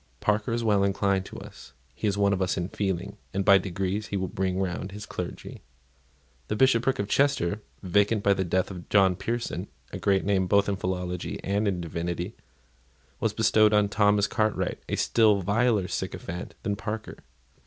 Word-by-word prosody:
Parker 105 +2 0
is 115 0 -1
well 105 -3 +3
inclined 100 -1 +1
to - - -9
us; - - -12 0.2
he 110 - -2
is 100 -1 0
one 100 -1 +3
of 95 - -1
us 90 0 0
in 90 0 -2
feeling; 95 -1 -3 0.2
and 100 0 0
by 100 -2 +7
degrees 95 +3 -3
he 100 - -2
will 95 0 -1
bring 95 0 -1
round 95 +1 -3
his 105 0 -7
clergy." 90 -1 -7 0.9
The 105 - -1
Bishopric 130 +1 +3
of 100 - -2
Chester, 110 -7 +1 0.2
vacant 100 +3 +2
by 100 - +5
the 95 - -1
death 95 +2 0
of 90 -3 -9
John 95 -3 +4
Pearson, 115 +5 -3 0.3
a - - -4
great 95 -1 +2
name 95 -2 +2
both 100 +1 +3
in 100 - 0
philology 90 -1 -3
and 100 +2 0
in 90 -3 -1
divinity, 85 +4 -4 0.8
was 110 - +1
bestowed 110 -1 +4
on 105 -1 +3
Thomas 105 -1 +3
Cartwright, 110 -1 -1
a - - 0
still 105 -4 +3
viler 105 0 +2
sycophant 90 0 -5
than 105 -2 -1
Parker. 110 +1 -5
100 Hz, 180 wpm, -27 LUFS, 95-105 Hz, 0.9 s, by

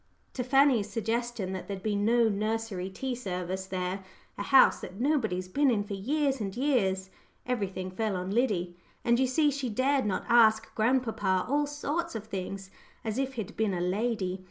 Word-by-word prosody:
to 250 - -2
Fanny's 260 -5 +4
suggestion 225 -2 -2
that 190 - -6
there'd 195 -2 -5
be 215 -1 0
no 230 +3 +3
nursery 215 -2 -2
tea 260 +7 -4
service 190 -4 -4
there 185 +1 -3 0.3
"a - - -5
house 265 +6 +6
that 190 - -9
nobody's 225 -10 0
been 280 +9 +2
in 215 -4 +1
for 205 - -6
years 270 +6 0
and 195 +1 -4
years" 190 -9 +1 0.3
everything 195 -6 -2
fell 210 +1 -1
on 180 - -2
old - - -2
Liddy! 195 -8 0 0.3
And 235 +1 +3
you 260 - +3
see 295 +3 +3
she 275 -2 -3
dared 260 +2 +1
not 195 - -2
go - - +1
asking 220 -1 +5
grandpapa 220 -6 +1
all 290 +2 +1
sorts 290 +2 -3
of 220 -1 -5
things, 195 -1 -5 0.3
as 220 +3 -2
if 270 0 -1
he'd 220 -5 -5
been 215 -4 0
a - - -2
lady. 190 0 -1
220 Hz, 185 wpm, -29 LUFS, 190-255 Hz, 0.3 s, house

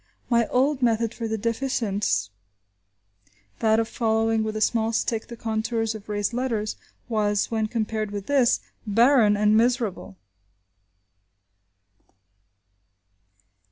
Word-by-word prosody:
My 235 -2 +3
old 270 +2 +1
method 230 -1 +1
for 230 - -4
the 220 0 -2
deficients, 210 - -1 1.3
that 220 0 +3
of 225 - 0
following 225 -1 +1
with 215 0 -3
a - - -2
small 225 +1 +1
stick 225 0 -1
the 235 - -9
contours 225 0 -1
of 215 -1 -11
raised 205 +1 -1
letters, 235 -4 -2 0.3
was, 210 -3 0
when 220 -1 0
compared 220 -1 -2
with 205 -1 -6
this, 265 -4 +3 0.3
barren 225 -1 +4
and 210 +1 +3
miserable! 225 - 0
225 Hz, 115 wpm, -24 LUFS, 215-235 Hz, 1.3 s, barren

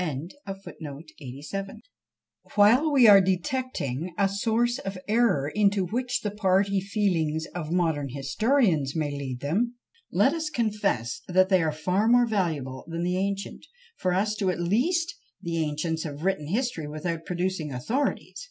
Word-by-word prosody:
While 235 +10 +5
we 260 -5 +6
are 200 -2 +9
detecting 185 - -2
a 200 - +3
source 230 +5 0
of 195 -7 -5
error 210 - +2
into 200 +3 +2
which 250 +6 -2
the 210 - -2
party 195 -1 +2
feelings 175 -6 0
of 165 -3 -5
modern 160 -5 0
historians 150 - +1
may 155 -3 -1
lead 135 -3 -5
them, 220 +12 0 0.4
let - - +3
us 320 -2 -2
confess 210 - -1
that 185 +1 +3
they 185 -3 +4
are 160 -1 +1
far 180 +8 0
more 245 +1 +5
valuable 160 - -2
than 165 +1 -3
the 180 +1 0
ancient; 200 +9 -3 0.3
for 185 - -1
to 180 - +1
us 215 +2 -1
at 185 -3 0
least 325 - +1 0.3
the 170 -1 -3
ancients 155 +2 -2
have 150 -1 -6
written 190 -6 0
history 205 - -1
without 160 +2 -4
producing 175 -3 -2
authorities! 225 - -2
185 Hz, 145 wpm, -26 LUFS, 160-220 Hz, 0.4 s, are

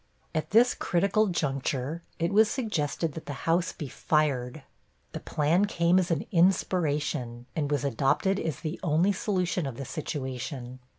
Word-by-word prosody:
At 155 - -2
this 235 +3 +5
critical 200 +4 +1
juncture 140 -2 -2 0.2
it 170 +3 -1
was 215 +1 +5
suggested 165 - -1
that 160 - -8
the 145 -2 -6
house 170 +2 +2
be 150 - -6
fired. 140 -2 0 0.5
The - - -5
plan 160 +6 +2
came 175 -2 +3
as 180 - 0
an 165 -4 0
inspiration, 150 -9 +1
and 145 -3 -1
was 145 -2 0
adopted 140 - +1
as 160 -6 -3
the 155 +1 -4
only 170 +4 +3
solution 185 -5 -1
of 125 -3 -6
the 135 - -5
situation. 130 -4 -5
155 Hz, 155 wpm, -28 LUFS, 140-180 Hz, 0.5 s, this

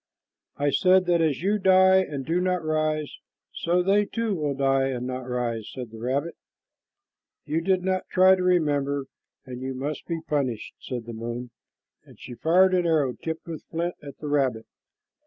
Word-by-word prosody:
"I 145 0 +1
said 185 +3 +4
that 175 -1 +2
as 155 -1 0
you 205 +2 +1
die 190 0 +6
and 150 -8 -1
do 170 +5 0
not 180 -2 0
rise, 155 -1 -1 0.3
so 175 +1 +1
they 200 +2 +3
too 230 0 -2
will 150 -5 -1
die 135 0 +2
and 125 -2 -3
not 130 0 -5
rise," 120 -3 -2
said 125 -4 -7
the 115 - -10
rabbit. 135 +7 -2 1.1
"You 155 +2 -1
did 185 +1 +1
not 185 0 -1
try 185 0 +6
to 190 - 0
remember, 145 -6 +1 0.4
and 125 -1 -8
you 130 0 -4
must 145 +4 -4
be 165 -1 -2
punished," 140 -8 -2
said 120 -3 -6
the 115 - -7
moon, 120 +2 -5 0.5
and - - -18
she - - -9
fired 180 +8 +3
an 180 -2 +2
arrow 150 -6 +2
tipped 160 +4 -6
with 160 -2 -6
flint 170 +2 -3
at 140 -2 -10
the 150 - -7
rabbit. 135 -6 0
155 Hz, 180 wpm, -25 LUFS, 130-180 Hz, 1.1 s, die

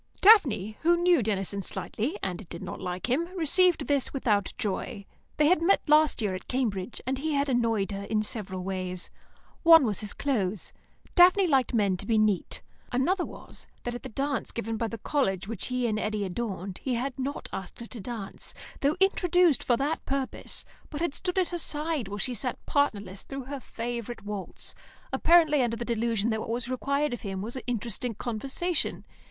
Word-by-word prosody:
Daphne, 255 - +5
who 345 +1 +4
knew 350 -4 +4
Denison 200 -2 -1
slightly, 245 - -3
and 185 0 -4
did 170 - -7
not - - -6
like 180 +3 -3
him, 270 +7 +1
received 340 -1 +4
this 280 -3 +1
without 210 -7 +1
joy. 200 0 -3 0.3
They 300 - +4
had 330 +1 +4
met 380 +4 +3
last 300 -5 +4
year 200 -3 0
at 185 - -6
Cambridge, 230 -5 -2
and 260 +1 -1
he 310 +2 -1
had 280 0 +2
annoyed 230 -5 +1
her 200 0 -4
in 215 0 0
several 190 -5 -5
ways. 185 -1 -3 0.5
One 325 -4 +8
was 210 -5 -1
his 210 -2 -4
clothes; 210 - -1 0.4
Daphne 365 +2 +7
liked 265 -6 +2
men 200 -4 +2
to 200 - -8
be 225 - +3
neat. 215 -4 +1 0.3
Another 345 +9 +2
was, - - -9 0.2
that 240 - -3
at 245 - -6
the - - -7
dance 275 +2 -2
given 225 -1 -3
by 230 +1 -1
the 230 - -5
college 195 -7 0
which 225 -3 -4
he 250 -1 -1
and 215 -2 0
Eddy 210 -1 -1
adorned, 190 -2 -4
he 255 -2 -1
had 260 +2 -3
not 275 +3 -3
asked 190 -2 -6
her 235 - -6
to 235 0 -9
dance, 220 -2 -5 0.2
though 285 +5 +1
introduced 360 -5 +4
for 240 - +3
that 290 +5 -1
purpose, 270 -1 -3 0.2
but 295 - -5
had 340 -4 0
stood 360 +3 -2
at 370 -2 +2
her 345 - -3
side 300 -6 0
while 205 +1 -5
she 250 +5 -1
sat 245 +2 -3
partnerless 205 -9 0
through 275 -1 -6
her 275 +2 -6
favourite 235 -2 -5
waltz, 205 -2 -4 0.4
apparently 320 -4 +5
under 230 -2 0
the 240 - -4
delusion 230 -1 0
that 220 - 0
what - - -5
was 235 +1 -2
required 280 +3 0
of 240 - -5
him 195 -2 -4
was 230 +4 -5
interesting 235 0 -2
conversation. 275 - -1
240 Hz, 190 wpm, -28 LUFS, 210-290 Hz, 0.5 s, One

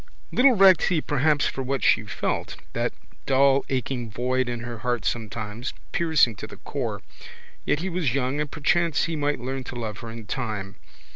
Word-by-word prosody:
Little 255 +1 +6
recked 190 -4 +7
he 175 -4 +2
perhaps 145 0 +2
for 135 - -2
what 135 +1 -2
she 110 - +4
felt, 105 - -2 0.2
that - - 0 0.4
dull 135 0 +4
aching 125 -2 -2
void 125 +3 0
in 120 -1 -3
her 120 -1 -6
heart 120 0 -1
sometimes, 110 +1 -3 0.2
piercing 160 -8 +3
to - - -6
the - - -12
core. - - -4 0.6
Yet 150 - +1
he 190 - -2
was 165 -8 0
young 135 +2 0
and 150 - -2
perchance 165 +2 +1
he 165 - -1
might 145 -2 0
learn 130 +2 -4
to - - -7
love 110 -3 -4
her 115 - -7
in 115 -1 -8
time. 105 -4 -4
130 Hz, 185 wpm, -25 LUFS, 115-150 Hz, 0.6 s, recked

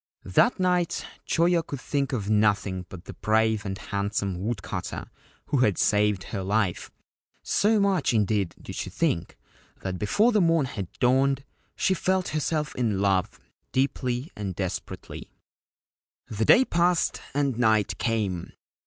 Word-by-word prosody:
That 210 - +3
night 180 -2 +1 0.2
Choyo 170 +1 +3
could 145 -4 -7
think 140 +1 -1
of 110 -7 -2
nothing 100 -3 +1
but 90 -1 -10
the - - -8
brave 110 0 +1
and 95 0 -3
handsome 100 -2 -2
woodcutter 110 -4 -4 0.3
who 145 - 0
had 105 -7 +3
saved 105 -2 +2
her 100 - -2
life; 100 -1 0 0.5
so 215 +1 +2
much, 195 -9 +2
indeed, 105 -5 +1
did - - -9
she - - -4
think 85 0 -1 0.5
that 95 -2 -3
before 210 - +3
the 215 -3 +3
morn 165 -4 +3
had 100 -8 -6
dawned 135 +2 +2 0.3
she 190 - +2
felt 185 0 0
herself 155 0 -1
in 110 -6 0
love, 95 -2 +1 0.3
deeply 130 +1 -1
and 100 -4 -4
desperately. 95 -1 -5 1.0
The 110 +1 -1
day 260 - +6
passed 175 -2 +1
and 140 -4 0
night 110 -5 +2
came. 105 -7 -1
110 Hz, 140 wpm, -26 LUFS, 100-150 Hz, 1.0 s, day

